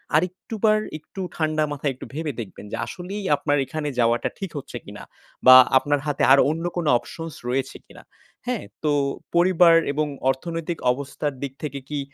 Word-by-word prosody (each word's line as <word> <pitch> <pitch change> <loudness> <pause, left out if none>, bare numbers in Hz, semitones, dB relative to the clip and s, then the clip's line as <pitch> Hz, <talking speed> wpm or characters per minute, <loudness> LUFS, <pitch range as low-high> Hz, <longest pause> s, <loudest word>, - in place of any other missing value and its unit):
আরেকটুবার 200 +6 +1 0.2
একটু 160 +5 -10
ঠান্ডা 155 -1 0
মাথায় 145 -1 -2
একটু - - -9
ভেবে 155 +1 -3
দেখবেন 105 -1 -10
যে - - -3
আসলেই 195 +3 -6
আপনার 145 0 0
এখানে 155 +1 -4
যাওয়াটা 120 0 +2
ঠিক 195 -3 -5
হচ্ছে 140 - -6
কিনা? - - -10 0.4
বা 130 0 +11 0.2
আপনার 145 +2 +1
হাতে 145 -2 -1
আর 135 - +8
অন্য 165 +2 -2
কোনো 170 -3 -1
options 165 +4 -8 0.2
রয়েছে 130 +2 -2
কিনা, - - -15 0.4
হ্যাঁ? 245 -4 -1 0.2
তো 150 - +2 0.4
পরিবার 175 -1 +6 0.2
এবং 150 +1 0 0.2
অর্থনৈতিক 165 +5 -3
অবস্থার 140 +2 -3
দিক 135 -2 -4
থেকে 140 -2 -4
কি, 150 -1 -2
155 Hz, 165 wpm, -23 LUFS, 140-170 Hz, 0.4 s, বা